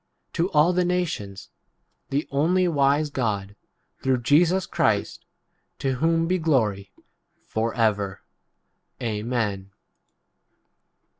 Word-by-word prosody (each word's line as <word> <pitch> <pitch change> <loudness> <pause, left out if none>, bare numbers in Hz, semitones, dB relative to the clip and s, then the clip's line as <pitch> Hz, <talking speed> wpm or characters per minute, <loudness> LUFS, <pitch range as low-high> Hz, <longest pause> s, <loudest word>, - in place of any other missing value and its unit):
to 170 +2 0
all 160 +2 +4
the 180 0 +2
nations 170 - -3 0.3
— - - -48
[the] 140 +2 -1
only 175 +6 +2
wise 145 -1 +2
God, 100 -6 -2 0.5
through 130 -2 0
Jesus 170 +7 +3
Christ, - - -1 0.5
to 135 -2 -1
whom 165 +4 +2
v 185 +2 +1
be - - -7
glory 105 -11 +1 0.6
for 115 +1 -1
ever. 105 -4 0 0.8
Amen. 105 -3 -2
135 Hz, 105 wpm, -24 LUFS, 105-165 Hz, 0.8 s, all